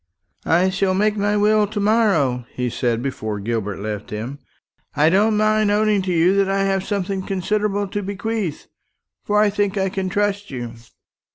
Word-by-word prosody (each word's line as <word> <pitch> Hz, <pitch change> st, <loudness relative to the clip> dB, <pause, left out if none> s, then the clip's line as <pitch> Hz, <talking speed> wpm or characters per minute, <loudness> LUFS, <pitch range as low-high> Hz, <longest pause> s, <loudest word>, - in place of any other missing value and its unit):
"I 180 Hz, +3 st, +3 dB
shall 190 Hz, 0 st, +1 dB
make 210 Hz, +2 st, +2 dB
my 205 Hz, 0 st, +1 dB
will 210 Hz, 0 st, +3 dB
to 210 Hz, +1 st, -4 dB
morrow," 195 Hz, -, +2 dB
he 125 Hz, -1 st, -2 dB
said, 120 Hz, -1 st, -1 dB
before 110 Hz, -6 st, -3 dB
Gilbert 105 Hz, -2 st, -3 dB
left 105 Hz, 0 st, -5 dB
him. 115 Hz, +7 st, -5 dB, 0.6 s
"I 150 Hz, +2 st, +4 dB
don't 210 Hz, +3 st, +3 dB
mind 215 Hz, 0 st, +2 dB
owning 210 Hz, -1 st, +2 dB
to 185 Hz, -1 st, -2 dB
you 175 Hz, +3 st, +3 dB
that 195 Hz, -1 st, +2 dB
I 195 Hz, 0 st, +1 dB
have 195 Hz, -1 st, 0 dB
something 195 Hz, -1 st, -2 dB
considerable 200 Hz, +2 st, -1 dB
to 205 Hz, -, -3 dB
bequeath; 200 Hz, -3 st, -3 dB, 0.6 s
for 210 Hz, 0 st, +1 dB
I 210 Hz, -1 st, +4 dB
think 205 Hz, 0 st, -1 dB
I 190 Hz, 0 st, +1 dB
can 190 Hz, 0 st, -3 dB
trust 205 Hz, +1 st, -1 dB
you. 120 Hz, -3 st, -6 dB
195 Hz, 175 wpm, -21 LUFS, 145-205 Hz, 0.6 s, I